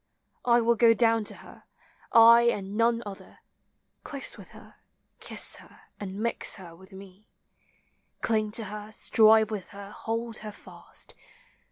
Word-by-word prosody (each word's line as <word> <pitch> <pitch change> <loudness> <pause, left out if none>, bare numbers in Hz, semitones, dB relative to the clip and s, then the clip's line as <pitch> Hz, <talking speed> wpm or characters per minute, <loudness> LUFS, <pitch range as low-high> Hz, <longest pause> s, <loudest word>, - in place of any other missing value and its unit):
I 240 -1 +4
will 235 +1 +3
go 230 0 +5
down 225 -1 +2
to - - -4
her, - - -16 0.5
I 235 +1 +7
and 200 -3 -4
none 230 +1 +2
other, 200 -2 -11 0.6
Close 280 -2 -4
with - - -13
her, - - -16 0.4
kiss - - -1
her, - - -18 0.2
and 195 -2 -6
.mix 235 +2 0
her 175 -4 -12
with 190 +3 -17
me; 195 +1 -14 0.9
Cling 215 -2 0
to 230 - 0
her, 210 +1 -8
strive 220 0 +4
with 200 -4 -5
her, 200 0 -10
hold 230 +1 -4
her 215 -1 -8
fast. - - -11
220 Hz, 150 wpm, -27 LUFS, 200-230 Hz, 0.9 s, I